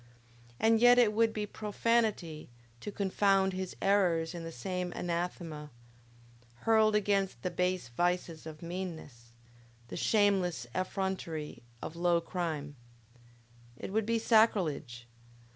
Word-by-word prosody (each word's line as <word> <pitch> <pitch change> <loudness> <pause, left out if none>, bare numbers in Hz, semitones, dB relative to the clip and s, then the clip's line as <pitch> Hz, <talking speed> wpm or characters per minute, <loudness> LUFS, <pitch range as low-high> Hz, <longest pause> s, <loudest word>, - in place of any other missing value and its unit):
And 225 0 +4
yet 245 +1 +7
it 230 -4 +5
would 225 +1 +3
be 210 -1 -3
profanity 210 - -1 0.3
to 210 - -6
confound 195 -1 +2
his 185 0 -4
errors 180 -5 +2
in 170 -1 -6
the 165 - -6
same 180 +6 -3
anathema, 170 -3 -4 0.9
hurled 220 -1 +4
against 200 -2 +1
the 180 - -1
base 180 -7 -1
vices 175 +3 -1
of 155 +1 -9
meanness, 165 -9 -7 0.6
the - - -6
shameless 195 - +2
effrontery 185 -5 -3 0.2
of 160 - -6
low 170 0 +2
crime! 160 -5 -4 1.0
It 190 - -7
would 220 0 +1
be 230 0 +2
sacrilege! 175 - +2
180 Hz, 120 wpm, -31 LUFS, 165-205 Hz, 1.0 s, yet